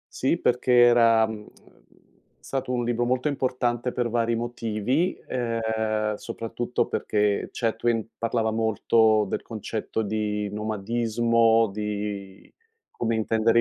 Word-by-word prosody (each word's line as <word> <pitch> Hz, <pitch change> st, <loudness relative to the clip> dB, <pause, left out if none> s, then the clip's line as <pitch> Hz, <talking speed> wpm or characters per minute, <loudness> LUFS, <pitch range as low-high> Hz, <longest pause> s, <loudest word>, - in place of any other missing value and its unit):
Sì, 135 Hz, +6 st, +1 dB
perché 125 Hz, +1 st, +1 dB
era, 115 Hz, -2 st, +6 dB
mhmm, 110 Hz, 0 st, -5 dB
ehm, -, -, -16 dB, 0.9 s
è -, -, -42 dB
stato 130 Hz, -2 st, -3 dB
un 120 Hz, -1 st, 0 dB
libro 120 Hz, 0 st, 0 dB
molto 125 Hz, +4 st, 0 dB
importante 125 Hz, -3 st, -1 dB
per 120 Hz, -2 st, -2 dB
vari 115 Hz, 0 st, +1 dB
motivi, 120 Hz, -, -1 dB
ehm, 110 Hz, -3 st, -1 dB
soprattutto 120 Hz, +2 st, -3 dB
perché 105 Hz, -1 st, 0 dB
Chatwin 115 Hz, -1 st, -1 dB
parlava 115 Hz, -1 st, 0 dB
molto 110 Hz, 0 st, +3 dB
del -, -, -3 dB
concetto 110 Hz, 0 st, -4 dB
di 105 Hz, 0 st, -2 dB
nomadismo, 115 Hz, +1 st, +1 dB
di 105 Hz, -2 st, -5 dB, 0.4 s
come 115 Hz, -1 st, -1 dB
intendere 110 Hz, +1 st, +2 dB
115 Hz, 120 wpm, -25 LUFS, 110-120 Hz, 0.9 s, era